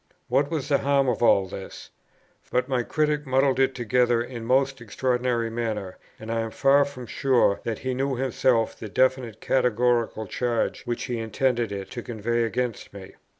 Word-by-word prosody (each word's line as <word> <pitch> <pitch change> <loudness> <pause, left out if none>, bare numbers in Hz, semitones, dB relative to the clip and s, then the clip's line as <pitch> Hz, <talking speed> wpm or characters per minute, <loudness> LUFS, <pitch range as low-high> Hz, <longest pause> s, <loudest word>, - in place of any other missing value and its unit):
What 145 +1 +2
was 155 -5 -3
the 140 - +3
harm 140 -1 +2
of 125 - 0
all 100 -5 +5
this? 95 +1 -9 0.6
but 125 0 0
my 130 -3 0
Critic 150 +2 -1
muddled 130 0 +2
it 135 0 +2
together 120 0 +2
in 120 0 -8
a - - -7
most 135 +1 +1
extraordinary 120 0 -1
manner, 110 -5 -4 0.2
and 110 +1 -6
I 115 - 0
am 115 0 -2
far 140 +4 +4
from 135 -3 -8
sure 120 -4 +2
that 115 -2 -2
he 130 0 -3
knew 135 +1 -1
himself 125 -2 +1
the 110 - -8
definite 130 -2 0
categorical 120 -3 +1
charge 120 +4 -2
which 120 -1 -3
he 120 -3 -3
intended 120 0 0
it 100 -1 -6
to 120 - -5
convey 120 0 -2
against 120 0 -3
me. 95 -2 -10
125 Hz, 180 wpm, -25 LUFS, 115-130 Hz, 0.6 s, all